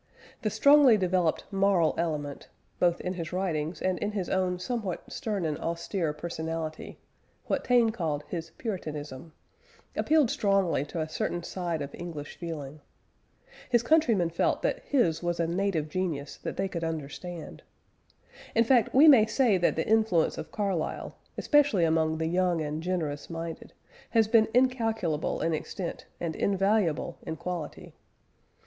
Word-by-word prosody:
The - - 0
strongly 280 -5 +6
developed 180 -3 +1
moral 195 -4 +3
element, 150 -4 -3 0.3
both 175 -1 +3
in 180 - -2
his 170 -3 -5
writings 175 -3 -2
and 185 -1 0
in 210 0 -2
his 190 -4 -2
own 185 -1 +1
somewhat 200 -1 -3
stern 205 -6 -2
and 155 -2 -2
austere 170 0 -2
personality 160 0 -5 0.5
what - - -1
Taine 240 -3 +4
called 160 -9 -2
his 165 -2 -5
"puritanism" 155 - -5 0.6
appealed 305 -6 +3
strongly 195 -8 +1
to 165 +3 -5
a 155 - -2
certain 175 +2 -3
side 170 -5 -3
of 140 - -8
English 165 -4 -7
feeling. 155 -4 -7 0.9
His 240 -2 +3
countrymen 235 - +3
felt 170 - 0
that - - 0
his 180 - +1
was 175 -1 -2
a 170 - +2
native 170 -2 0
genius 160 -4 -3
that - - -6
they 195 - 0
could 170 -3 -5
understand. 165 +1 -6 0.9
In 230 - +5
fact 240 -1 +3
we 290 +4 +8
may 240 -8 +8
say 220 -3 +3
that 175 - +2
the 160 - -1
influence 215 -7 +2
of - - -7
Carlyle, 195 -6 -2 0.2
especially 290 - +3
among 160 -1 +1
the 160 - -1
young 175 0 +1
and 155 0 -3
generous 165 -5 -3
minded, 165 -1 -6 0.4
has 225 -2 +3
been 220 0 +5
incalculable 225 - +1
in 165 - +1
extent 170 +3 -5
and 165 -2 -3
invaluable 195 -4 +1
in 160 - -5
quality. 170 -2 -6
175 Hz, 150 wpm, -28 LUFS, 160-210 Hz, 0.9 s, we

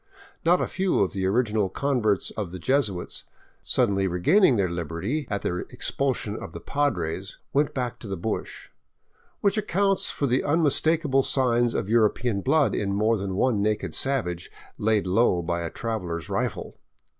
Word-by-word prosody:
Not 175 +2 +4
a - - +1
few 185 +2 0
of 95 - +1
the 95 -1 -1
original 105 -2 +1
con 140 +4 -1
verts 105 -3 +1
of 105 -5 -4
the 90 - -7
Jesuits, 105 - -1 0.4
suddenly 100 -6 +1
regaining 130 - +4
their 100 -4 +2
liberty 85 - -3
at 100 -1 -2
the 90 - -1
expulsion 130 -6 -2
of - - -8
the - - -6
Padres, 95 - -2
'* - - -47
went 145 +1 +1
back 125 -3 -3
to 115 - -9
the 95 -1 -4
bush," 110 +6 -4 0.7
which 200 +1 +2
accounts 195 -1 +1
for 145 - -1
the 130 0 +2
unmis 150 -1 +2
takable 155 -4 +2
signs 120 -3 +2
of - - -1
European 110 -1 +2
blood 145 +4 +2
in 100 -1 -1
more 110 +3 +2
than 95 -2 -3
one 110 0 +2
naked 105 +1 -1
savage 90 -11 -1 0.3
laid 105 -1 +2
low 90 -2 +2
by 85 0 -2
a 85 - -3
traveler's 90 -9 -4
rifle. - - -3
110 Hz, 170 wpm, -25 LUFS, 95-140 Hz, 0.7 s, Not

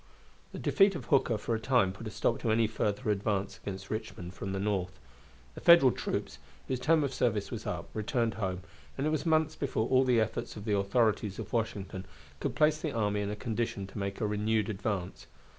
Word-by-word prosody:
The - - -7
defeat 195 -2 +4
of 145 - -5
Hooker 130 -5 +3
for 110 +2 -2
a 110 - 0
time 110 -5 +2
put 110 +3 -8
a - - -3
stop 115 +2 0
to 115 - -1
any 110 +1 +4
further 110 +1 -1
advance 100 -1 -1
against 95 -1 -7
Richmond 90 -5 -5
from 95 +1 -5
the 95 - -2
North. 95 -2 -1 0.5
The - - -10
Federal 170 -7 +8
troops, - - -3 0.3
whose 130 -2 -1
term 155 +4 +3
of 135 -2 -2
service 110 -6 0
was - - -5
up, - - -3
returned 115 +1 0
home, 95 -4 -3 0.4
and 135 - -1
it 155 - +1
was 155 +1 -1
months 160 -1 +2
before 130 -5 -1
all 130 0 +5
the 125 -3 +3
efforts 110 0 -2
of 105 - -8
the 105 -2 +1
authorities 100 0 +1
of - - -7
Washington 100 -4 -2 0.3
could - - -2
place 155 0 +3
the 155 - -1
army 105 -2 0
in 100 - -2
a 105 - -3
condition 110 -3 -2
to 95 +2 -8
make 100 0 -3
a 110 - 0
renewed 105 0 0
advance. 95 -3 -3
110 Hz, 210 wpm, -31 LUFS, 100-125 Hz, 0.5 s, Federal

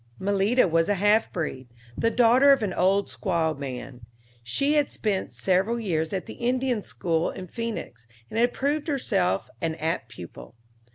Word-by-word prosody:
Malita 200 +4 +2
was 165 +1 +2
a 205 - +3
half 205 +3 +3
breed, 130 -7 -4 0.3
the 230 - +1
daughter 245 +4 +5
of 270 -5 +4
an 195 -4 -1
old 195 +3 +2
squaw 165 -4 -1
man. 130 -2 -7 0.4
She 275 - +1
had 295 -2 +2
spent 205 -3 -2
several 195 +6 +1
years 160 -7 -1
at 190 -2 -3
the - - -8
Indian 250 -1 0
school 165 -4 -1
in 185 - -7
Phœnix, 195 - -6 0.2
and 225 - -3
had 240 +1 +3
proved 290 +4 -1
herself 100 - 0
an 160 -1 -1
apt 160 -7 -2
pupil. 85 - -11
195 Hz, 165 wpm, -26 LUFS, 160-235 Hz, 0.4 s, daughter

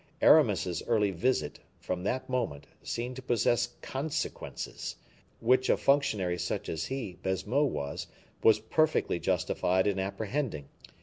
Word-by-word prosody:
Aramis's 90 -2 +4
early 105 -4 +3
visit, 95 - 0 0.2
from 90 -1 -4
that 130 +5 -1
moment, 115 - -2 0.2
seemed 120 +2 -4
to - - -6
possess 120 -2 +2
consequences, 140 +3 -4 0.4
which 130 +2 +3
a - - +4
functionary 105 -11 +2
such - - -3
as 80 0 -2
he 120 -9 -5
(Baisemeaux) 100 +10 +1
was, 70 - -3 0.3
was 110 -2 +6
perfectly 155 - +1
justified 95 +2 +1
in 100 -2 +1
apprehending. 100 - -3
110 Hz, 125 wpm, -30 LUFS, 90-130 Hz, 0.4 s, was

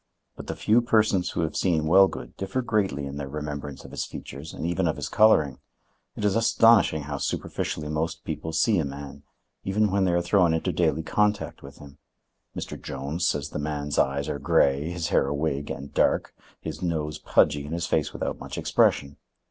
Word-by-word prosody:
But - - -10
the - - -3
few 115 +3 +3
persons 110 -6 +2
who - - -2
have 80 - -2
seen 80 -5 +1
Wellgood 90 -7 +3
differ 95 +7 -3
greatly 95 -11 0
in 70 +1 -6
their 70 -2 -5
remembrance 75 -1 -6
of - - -11
his - - -3
features, 70 +5 -8
and - - -6
even 85 +1 0
of 80 - 0
his - - -4
coloring. 75 -11 +4 0.6
It 105 - -3
is 100 - +2
astonishing 115 -8 +4
how 70 -1 -5
superficially 75 +2 -3
most 80 +2 -3
people 80 - -4
see 95 +5 +2
a - - +1
man, 70 0 -7 0.4
even 105 +1 +1
when 100 -1 +2
they 90 - +2
are 85 - +2
thrown 85 -2 +3
into 80 - -1
daily 80 +3 +1
contact 105 +5 0
with 70 0 -12
him. 70 -2 -14 0.6
Mr. - - -6
Jones 75 +6 -3
says 75 0 -1
the - - -4
man's 75 -1 -2
eyes 70 +2 +1
are 70 - -3
gray, 70 +2 +2
his 85 -2 -3
hair - - +2
a 70 - -1
wig 70 -1 -2
and 70 0 -7
dark, - - +1 0.3
his - - -7
nose 75 -3 -2
pudgy, 75 -1 +2
and 75 - -6
his 85 -1 -2
face - - 0
without - - -4
much - - -7
expression. 70 0 +1
80 Hz, 195 wpm, -26 LUFS, 70-95 Hz, 0.6 s, coloring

